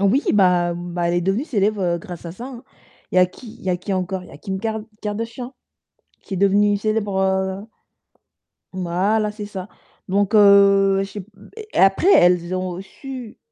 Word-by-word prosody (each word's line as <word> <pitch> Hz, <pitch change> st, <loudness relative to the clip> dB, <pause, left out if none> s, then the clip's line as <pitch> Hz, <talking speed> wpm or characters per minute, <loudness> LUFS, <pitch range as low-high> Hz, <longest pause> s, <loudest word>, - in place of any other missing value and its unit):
Oui, 200 Hz, +9 st, +3 dB
bah, 180 Hz, -4 st, +3 dB
hem, 175 Hz, 0 st, -6 dB
bah, 175 Hz, -1 st, 0 dB
elle 170 Hz, -, 0 dB
est 175 Hz, -, +2 dB
devenue 195 Hz, -, 0 dB
célèbre, 210 Hz, -, 0 dB
heu, 170 Hz, -1 st, 0 dB
grâce 175 Hz, -4 st, -9 dB
à 170 Hz, -, -5 dB
ça, 230 Hz, +7 st, -9 dB
hein. 250 Hz, -3 st, -9 dB, 0.5 s
Il -, -, -3 dB
y -, -, +7 dB
a 180 Hz, -, +7 dB
qui 220 Hz, +5 st, -13 dB
il -, -, -18 dB
y 185 Hz, -, 0 dB
a 180 Hz, -, +1 dB
qui 195 Hz, -, -4 dB
encore? 185 Hz, 0 st, -2 dB
Il 180 Hz, -, -14 dB
y -, -, -14 dB
a -, -, -10 dB
Kim 190 Hz, +1 st, -5 dB
Kar 220 Hz, -1 st, -2 dB, 0.2 s
Kardashian 230 Hz, +5 st, -5 dB, 0.7 s
qui 200 Hz, -, -8 dB
est 190 Hz, -, -2 dB
devenue 200 Hz, +1 st, +3 dB
célèbre, 210 Hz, -2 st, -1 dB
heu 190 Hz, 0 st, 0 dB, 1.1 s
Voilà, 190 Hz, +4 st, 0 dB
c'est 210 Hz, -1 st, -7 dB
ça. 195 Hz, -2 st, -7 dB, 0.4 s
Donc 200 Hz, +3 st, +1 dB
heu, 200 Hz, -1 st, +6 dB
je 195 Hz, -, -6 dB
sais 205 Hz, -, -6 dB
p 190 Hz, -, -21 dB, 0.4 s
et -, -, -4 dB
après, 195 Hz, -, +5 dB
elles 175 Hz, 0 st, +4 dB
ont 185 Hz, -1 st, -3 dB
su 255 Hz, +3 st, -9 dB
195 Hz, 205 wpm, -21 LUFS, 185-210 Hz, 1.1 s, y